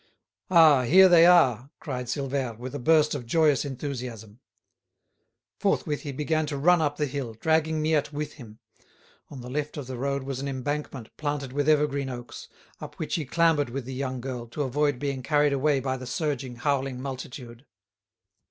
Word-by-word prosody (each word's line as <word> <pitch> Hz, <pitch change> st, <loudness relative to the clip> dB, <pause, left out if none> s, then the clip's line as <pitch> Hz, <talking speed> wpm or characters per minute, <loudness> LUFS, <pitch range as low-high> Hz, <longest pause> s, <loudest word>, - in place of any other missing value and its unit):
"Ah, 160 Hz, -6 st, +6 dB
here 185 Hz, +10 st, +7 dB
they 170 Hz, -2 st, +7 dB
are!" 135 Hz, -8 st, +4 dB
cried 125 Hz, -4 st, -5 dB
Silvère, 135 Hz, -3 st, -3 dB
with 125 Hz, +3 st, -7 dB
a 145 Hz, -, -4 dB
burst 155 Hz, +3 st, +3 dB
of 130 Hz, -5 st, -5 dB
joyous 150 Hz, 0 st, +3 dB
enthusiasm. 125 Hz, -6 st, -6 dB, 1.2 s
Forthwith 150 Hz, -1 st, 0 dB
he 145 Hz, -, -5 dB
began 155 Hz, +3 st, -1 dB
to 145 Hz, -1 st, -3 dB
run 175 Hz, +4 st, +4 dB
up 145 Hz, -1 st, -1 dB
the 150 Hz, -, 0 dB
hill, 130 Hz, -5 st, -5 dB
dragging 160 Hz, +4 st, +1 dB
Miette 155 Hz, -2 st, +1 dB
with 150 Hz, 0 st, -5 dB
him. 110 Hz, -6 st, -13 dB, 0.7 s
On 135 Hz, -3 st, -9 dB
the 120 Hz, -, -9 dB
left 150 Hz, +2 st, -3 dB
of 145 Hz, -, -5 dB
the 130 Hz, 0 st, -6 dB
road 140 Hz, +1 st, -1 dB
was 135 Hz, -1 st, -4 dB
an 140 Hz, -, -4 dB
embankment 135 Hz, -2 st, -4 dB
planted 145 Hz, -3 st, -3 dB
with 145 Hz, +2 st, 0 dB
evergreen 145 Hz, -3 st, +1 dB
oaks, 120 Hz, -1 st, -8 dB, 0.3 s
up -, -, -9 dB
which -, -, -4 dB
he 160 Hz, -, -1 dB
clambered 160 Hz, -1 st, +2 dB
with 130 Hz, +1 st, -5 dB
the 130 Hz, -, -6 dB
young 130 Hz, -1 st, -3 dB
girl, 125 Hz, -2 st, -5 dB
to 145 Hz, +6 st, -3 dB
avoid 145 Hz, +1 st, 0 dB
being 140 Hz, -1 st, -3 dB
carried 145 Hz, +1 st, +2 dB
away 140 Hz, +1 st, +2 dB
by 130 Hz, 0 st, -2 dB
the 130 Hz, 0 st, -8 dB
surging, 135 Hz, -3 st, -3 dB
howling 135 Hz, 0 st, -1 dB
multitude. 130 Hz, -1 st, -8 dB
140 Hz, 180 wpm, -26 LUFS, 130-150 Hz, 1.2 s, here